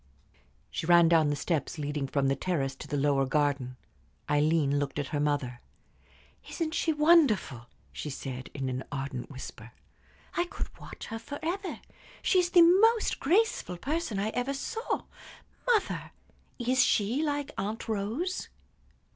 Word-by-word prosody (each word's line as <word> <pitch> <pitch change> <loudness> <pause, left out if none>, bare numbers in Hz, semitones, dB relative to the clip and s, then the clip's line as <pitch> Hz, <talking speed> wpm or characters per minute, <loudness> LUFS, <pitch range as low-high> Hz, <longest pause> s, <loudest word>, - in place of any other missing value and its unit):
She 160 - -4
ran 170 -1 +7
down 160 -3 +4
the 145 - +1
steps 150 0 -2
leading 145 -1 -2
from 135 0 +1
the 135 - +2
terrace 135 -3 -1
to - - -9
the 145 - -2
lower 140 -1 +2
garden. 140 -3 0 0.5
Aileen 150 -1 +2
looked 145 -1 -3
at 145 -2 -2
her 145 - -1
mother. 145 -5 -1 0.9
"Isn't 320 -2 -2
she 330 - +1
wonderful?" 295 - +3 0.3
she 150 - -5
said, 130 -2 -6
in 135 -2 -2
an 130 0 -3
ardent 135 -2 -4
whisper. 130 -2 -9 0.6
"I 350 - +2
could 350 - -6
watch - - -9
her 225 - -5
forever. 340 - -4 0.4
She 370 - +4
is 350 -1 +2
the 350 -1 +7
most 425 +6 +4
graceful 345 - +1
person 290 - -2
I 200 +2 0
ever 250 +4 -2
saw. 450 - -3 0.6
Mother, 460 -4 +1 0.4
is 250 +1 +3
she 220 +8 +2
like 290 -2 -1
Aunt 210 +5 -3
Rose?" 225 - -2
175 Hz, 145 wpm, -29 LUFS, -, 0.9 s, ran